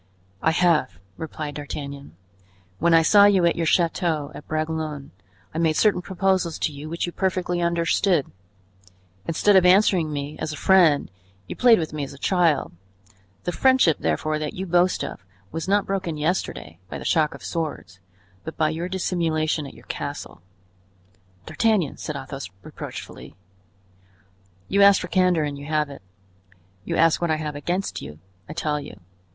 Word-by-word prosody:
"I - - +3
have," 160 - +2 0.2
replied 155 0 -6
D'Artagnan. 140 - -7 0.6
"When 170 +1 +3
I 165 - +6
saw 200 +5 +7
you 195 -4 +4
at 170 - +3
your 165 -1 -1
chateau 165 -3 +1
at 150 - -11
Bragelonne, 155 -2 -3 0.4
I 160 - -3
made 160 -2 +2
certain 205 -2 +3
proposals 185 -2 0
to 155 - -2
you 145 +2 -8
which 170 +1 -2
you 175 - -5
perfectly 180 -2 -1
understood; 170 -1 +1 1.0
instead 195 +5 +3
of 190 - +7
answering 180 -3 +4
me 145 +1 -5
as 155 - -3
a 150 - -6
friend, 170 - +4 0.3
you - - -7
played 240 -2 +6
with 160 -3 -3
me 150 -1 -3
as 140 - -7
a - - -12
child; 170 -2 +1 0.7
the 175 - -2
friendship, 255 - +3
therefore, 155 0 -1
that 150 -1 -4
you 190 - -4
boast 180 0 +2
of 95 - -7 0.3
was 165 +1 -4
not 200 +1 +2
broken 190 -5 -3
yesterday 150 - -3
by - - -5
the - - -9
shock 155 -2 +2
of - - -13
swords, 150 - -4 0.4
but 160 - -8
by 155 -1 +2
your 170 +3 -4
dissimulation 165 -5 -1
at - - -12
your - - -16
castle." - - -6 1.0
"D'Artagnan!" 210 -10 +1
said 150 - -5
Athos, 135 -4 -6
reproachfully. - - -9 1.3
"You 200 +1 +2
asked 200 0 +7
for 180 - -6
candor 180 -3 +3
and 145 -1 -4
you 145 - -9
have 150 -2 0
it. 140 - -11 0.8
You - - -2
ask 165 0 +3
what 170 - 0
I 155 - +2
have 155 -1 -4
against 175 +7 -3
you; 75 +2 -9 0.3
I - - -5
tell 150 -2 -1
you. 125 -8 -10
160 Hz, 170 wpm, -23 LUFS, 150-180 Hz, 1.3 s, saw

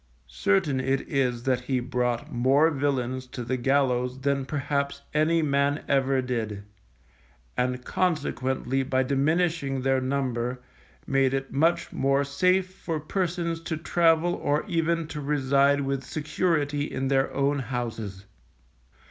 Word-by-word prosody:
Certain 100 - +1
it 135 +1 0
is 125 -3 0
that 130 -1 +1
he 130 -1 0
brought 125 -1 -2
more 135 +6 +4
villains 130 -3 -1
to 125 -1 -6
the 125 +2 -1
gallows 130 -1 +1
than 140 -1 0
perhaps 140 0 -2
any 160 +2 +3
man 140 0 +1
ever 135 -1 +2
did, 110 -5 -3 0.9
and 125 0 -1
consequently 135 -6 0
by 130 0 +1
diminishing 140 0 0
their 135 0 +2
number, 130 -2 -1 0.5
made 135 -1 +2
it 135 0 -4
much 160 +5 +1
more 135 +1 +2
safe 180 +6 +1
for 165 -4 -4
persons 170 0 -2
to 160 -1 -3
travel 165 +1 +2
or 145 +5 0
even 165 -2 0
to 150 -1 -6
reside 140 0 +2
with 135 -1 -2
security 150 0 -1
in 135 +1 -2
their 135 0 +2
own 140 +1 +1
houses. 115 -7 -4
135 Hz, 130 wpm, -26 LUFS, 130-150 Hz, 0.9 s, more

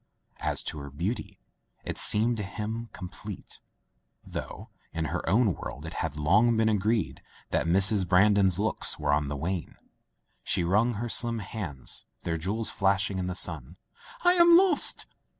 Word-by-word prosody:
As - - -1
to 75 - -4
her 70 0 -8
beauty, 100 - -5 0.5
it - - -4
seemed 115 +3 +2
to - - -3
him 110 +3 -5
com 90 - -8
plete - - -10 0.7
(though - - -8 0.2
in 80 -1 -3
her 90 - -2
own 105 0 +3
world 75 -1 -8
it 80 - -7
had 80 -2 -4
long 105 +10 +3
been 110 0 +2
agreed 110 +1 -1 0.3
that - - 0
Mrs. 95 +2 +4
Brandon's 95 0 +3
looks 105 +2 0
were 70 - 0
on 75 0 0
the 70 0 -4
wane). 85 +1 -4 0.7
She 90 - +1
wrung 105 +7 +1
her 120 +4 -4
slim 120 0 +3
hands, 90 - -5 0.2
their 85 - -2
jewels 105 +7 -2
flashing 100 0 0
in 90 - -3
the 90 - -4
sun. 80 -2 -2 0.5
"I 355 - +5
am 340 -1 +7
lost!" 365 -5 +5
100 Hz, 165 wpm, -27 LUFS, 85-110 Hz, 0.7 s, am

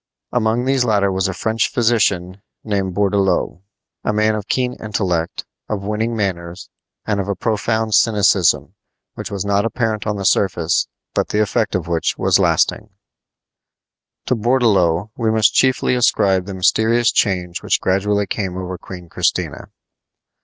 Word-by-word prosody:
Among 120 +1 0
these 135 -1 +2
latter 100 -4 +2
was 95 +1 0
a - - -2
French 110 +5 -1
physician 100 -6 +1 0.2
named 100 -4 -2
Bourdelot 100 -3 0 0.4
a - - 0
man 110 +1 +2
of 105 -2 -4
keen 125 -1 0
intellect, 95 -6 -2 0.2
of 100 -2 -3
winning 110 +3 -2
manners, 90 -3 -4 0.3
and 105 -2 -1
of 100 - -2
a 100 - -1
profound 110 +2 -1
cynicism, 100 -5 +3 0.4
which - - -7
was 100 -1 -4
not 100 0 +1
apparent 115 -2 -2
on 105 - -1
the 100 -1 -4
surface, 85 -4 +1 0.3
but - - 0
the 105 - -1
effect 110 +1 0
of 90 -2 -2
which 85 -2 -1
last - - +3
lasting. - - +1 1.4
To - - +1
Bourdelot 105 -6 +2
we 115 -2 0
must 110 -1 +3
chiefly 130 -1 +2
ascribe 100 -6 +2
the 100 - -5
mysterious 110 +6 +2
change 90 -4 0
which - - +1
gradually 100 +2 0
came 95 -1 -4
over 90 -1 -5
Queen 90 -2 -10
Christina. - - -2
100 Hz, 150 wpm, -19 LUFS, 95-110 Hz, 1.4 s, cynicism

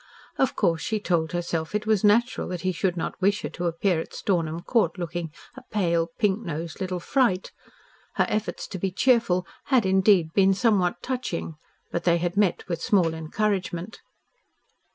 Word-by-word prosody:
Of 265 - +2
course 165 -1 +1
she 220 -1 -1
told 170 -5 0
herself 170 0 -2
it 210 0 -1
was 215 -2 +2
natural 230 +4 +3
that 180 -2 -4
he 185 - 0
should 180 0 -1
not 165 - -4
wish 200 +2 +2
her - - -3
to 175 -1 -3
appear 170 +1 +1
at - - -7
Stornham 165 -4 -1
Court 230 +1 +1
looking 175 -2 -4 0.2
a 260 - -10
pale, 170 -5 +1
pink 205 -2 +2
nosed 165 -1 -5
little 185 -1 -2
fright. 195 -2 +1 0.6
Her - - +3
efforts 215 0 -2
to 190 - -5
be 195 - 0
cheerful 195 -3 +2 0.2
had 255 -6 +3
indeed 190 -3 +3
been 195 -1 +4
somewhat 200 -4 +1
touching, 250 -11 -3 0.4
but 170 - -2
they 170 -1 +3
had 175 +1 -2
met 200 -4 +1
with 170 -3 -3
small 185 -8 +2
encouragement. 185 +3 -2
185 Hz, 175 wpm, -25 LUFS, 170-210 Hz, 0.6 s, been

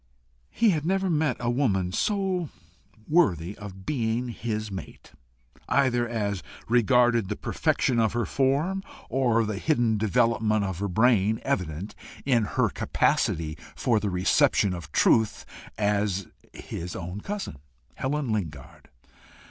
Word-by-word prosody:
He 225 -2 +3
had 155 -4 -1
never 190 +2 +1
met 150 -5 +1
woman 115 -8 +1
so 190 - 0 0.6
worthy 100 - +2
of 95 -2 -9
being 120 -2 -1
his 110 -2 -4
mate, 95 -5 -9 0.6
either 120 -4 +2
as 100 -5 -2 0.3
regarded 120 -2 +3
the - - -1
perfection 125 -3 0
of 110 -1 +2
her 120 0 0
form, 145 +8 +1 0.3
or 120 -3 +2
the 105 -2 -3
hidden 120 -8 +1
development 110 -1 +2
of 95 -3 -4
her 100 - -1
brain 110 +1 +3
evident 95 - -2 0.3
in 120 -5 +3
her - - +1
capacity 80 -1 0 0.2
for 120 -4 +2
the 105 - -2
reception 95 +1 +3
of 85 -2 -8
truth, 110 -2 +3 0.3
as 100 -2 0 0.3
his 85 +1 -7
own 90 +4 -6
cousin, 200 - -5 0.4
Helen 140 -2 -2
Lingard. 80 -11 -5
110 Hz, 125 wpm, -26 LUFS, 100-130 Hz, 0.6 s, He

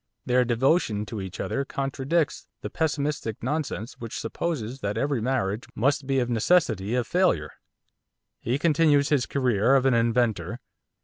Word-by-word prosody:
Their 125 0 +3
devotion 120 -2 +1
to 105 -2 -6
each 95 -2 -7
other 140 - -1
contradicts 135 - -1
the 105 - -6
pessimistic 145 -8 -2
nonsense 130 -4 -3
which 115 -1 -6
supposes 130 -1 -3
that 100 -1 -3
every 140 -1 0
marriage 115 -3 -1
must 135 +3 +1
be 135 -1 +1
of 125 -2 +1
necessity 115 - +2
a 125 - +1
failure. 115 - +1 0.9
He 120 +4 -1
continues 150 -2 +3
his 140 -4 +2
career 125 -2 +2
of 135 -1 +3
an 135 - +4
inventor. 115 -1 +1
125 Hz, 145 wpm, -26 LUFS, 115-140 Hz, 0.9 s, an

